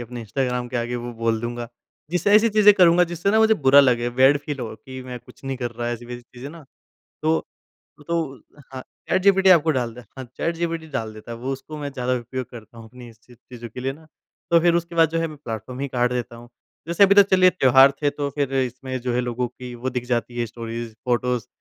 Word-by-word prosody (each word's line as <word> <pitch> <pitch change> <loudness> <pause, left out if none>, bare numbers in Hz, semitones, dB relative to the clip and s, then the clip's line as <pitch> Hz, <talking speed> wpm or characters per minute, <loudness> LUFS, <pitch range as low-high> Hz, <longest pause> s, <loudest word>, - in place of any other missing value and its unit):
अपने 120 0 -7
इंस्टाग्राम 125 +2 -2
के 125 - -4
आगे 120 +1 -2
वो 120 0 -6
बोल 115 -1 -1
दूँगा। 120 0 -5 0.4
जिससे 180 +3 +1
ऐसी 215 +2 +6
चीज़ें 210 -1 +6
करूँगा 180 -2 +5
जिससे 175 +3 -2
ना 220 - +3
मुझे 220 0 +5
बुरा 140 -4 +6
लगे, 120 -3 +2
बैड 130 +3 +4
फील 145 -1 -6
हो 115 -3 -5
कि 130 +2 -10
मैं 125 -1 -7
कुछ - - -19
नहीं 135 0 -3
कर 120 -2 -4
रहा 120 +1 -4
ऐसी-वैसी 120 +1 -7
चीज़ें 125 +3 -11
ना, 165 -1 -13 0.6
तो 160 +1 +1 0.6
तो 170 0 0 0.6
हाँ, 130 - -6 0.3
चैटजीपीटी 190 0 +4
आपको 165 -3 +5
डालता 125 -3 -3
है, - - -22
हाँ 130 - -6
चैटजीपीटी 165 -1 -2
डाल 110 -4 -3
देता 110 +2 -11
है, 115 - -6
वो 130 +3 -4
उसको 150 +3 -9
मैं 145 -1 -5
ज़्यादा 125 -2 -2
उपयोग 125 +2 -6
करता 115 -1 -13
हूँ 115 - -11
अपनी 125 0 -12
इस 115 -1 -19
ची 125 - -18
चीज़ों 120 0 -11
के 120 - -9
लिए 135 +1 -2
ना। 155 +2 -17 0.4
तो 170 - +6
फिर 170 0 +3
उसके 170 0 -2
बाद 165 -2 +4
जो 165 +1 -1
है 165 - -1
मैं 155 -1 -11
प्लेटफॉर्म 120 -1 -7
ही 140 - -2
काट 125 -1 0
देता 120 -1 -4
हूँ। 120 +1 -13 0.4
जैसे 170 +4 +4
अभी 200 0 +5
तो 200 - +9
चलिए 185 -1 +4
त्योहार 135 -5 +5
थे 145 - +3
तो 145 0 -4
फिर 140 -1 -2
इसमें 130 0 -2
जो 125 0 -2
है 125 - +1
लोगों 125 0 -2
की 125 +1 -10
वो 125 +2 -3
दिख 125 -1 -4
जाती 120 -1 -2
है 120 - 0
स्टोरीज, 115 0 -7
फोटोस 125 -1 0
130 Hz, 235 wpm, -22 LUFS, 120-160 Hz, 0.6 s, तो